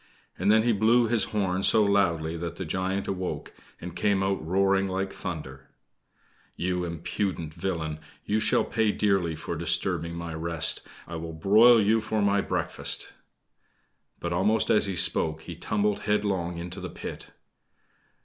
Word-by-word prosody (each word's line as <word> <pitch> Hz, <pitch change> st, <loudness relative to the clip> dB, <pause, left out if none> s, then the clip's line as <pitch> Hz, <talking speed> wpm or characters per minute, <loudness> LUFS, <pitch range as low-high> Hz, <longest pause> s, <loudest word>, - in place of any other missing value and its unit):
And 105 Hz, -, +2 dB
then 110 Hz, 0 st, +5 dB
he 120 Hz, -, +3 dB
blew 115 Hz, +3 st, +4 dB
his 115 Hz, -1 st, +2 dB
horn 95 Hz, -3 st, -1 dB
so 110 Hz, +2 st, +5 dB
loudly 85 Hz, -6 st, +1 dB
that 85 Hz, 0 st, -5 dB
the 95 Hz, -, -5 dB
Giant 95 Hz, +4 st, -2 dB
awoke, 95 Hz, -1 st, -4 dB, 0.3 s
and 85 Hz, 0 st, -8 dB
came 100 Hz, -2 st, +1 dB
out 95 Hz, -2 st, -1 dB
roaring 95 Hz, +3 st, +2 dB
like 95 Hz, +1 st, -2 dB
thunder: 70 Hz, -7 st, -7 dB, 0.9 s
"You 90 Hz, 0 st, -1 dB
impudent 85 Hz, -1 st, -3 dB
villain 80 Hz, -5 st, -3 dB, 0.3 s
you 105 Hz, +1 st, +1 dB
shall 110 Hz, 0 st, +2 dB
pay 110 Hz, -2 st, +1 dB
dearly 95 Hz, -6 st, +1 dB
for 80 Hz, +2 st, -5 dB
disturbing 85 Hz, +1 st, 0 dB
my 85 Hz, -1 st, -5 dB
rest. 80 Hz, -1 st, -1 dB, 0.3 s
I 80 Hz, -, -6 dB
will 80 Hz, 0 st, -6 dB
broil 110 Hz, +8 st, +6 dB
you 110 Hz, +2 st, +3 dB
for 110 Hz, 0 st, -2 dB
my 100 Hz, 0 st, +2 dB
breakfast!" -, -, -1 dB, 1.1 s
But 85 Hz, 0 st, -3 dB
almost 105 Hz, +5 st, +2 dB
as 105 Hz, -, +4 dB
he 95 Hz, -, -3 dB
spoke, 80 Hz, -2 st, +1 dB
he 85 Hz, -, -7 dB
tumbled 105 Hz, +4 st, -1 dB
headlong 95 Hz, -5 st, -1 dB
into 90 Hz, +3 st, -6 dB
the 90 Hz, -, -5 dB
pit. -, -, -8 dB
95 Hz, 155 wpm, -27 LUFS, 85-105 Hz, 1.1 s, broil